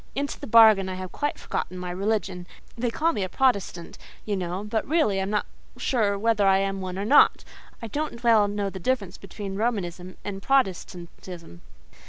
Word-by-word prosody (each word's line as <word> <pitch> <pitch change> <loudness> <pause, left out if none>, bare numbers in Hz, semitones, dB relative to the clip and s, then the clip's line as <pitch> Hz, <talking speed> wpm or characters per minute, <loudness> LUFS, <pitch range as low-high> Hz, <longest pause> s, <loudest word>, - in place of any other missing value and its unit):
Into 280 +1 -3
the - - -7
bargain 215 -4 +6
I 185 - -4
have 185 -1 -7
quite 290 0 -2
forgotten 185 - -4
my 180 0 -5
religion; 190 -2 -2 0.3
they 240 +1 -1
call 320 +9 0
me 205 - -2
a 185 - -2
Protestant, 200 -10 -1 0.3
you 210 - -1
know, 180 +1 -3
but 215 +1 -1
really 295 -11 +2
I - - 0
am 190 - -2
not 210 0 0 0.3
sure 210 -6 +1
whether 210 -1 +2
I 190 0 +5
am 195 0 -1
one 185 0 -5
or 200 - -2
not: 285 +7 +5 0.4
I - - -3
don't 285 -1 -4
well 225 -3 +5
know 205 -1 -2
the 190 - -7
difference 205 -3 -2
between 195 0 -7
Romanism 185 -5 -3
and 195 -1 -5
Protestantism. 180 - -2
200 Hz, 190 wpm, -25 LUFS, 185-230 Hz, 0.4 s, bargain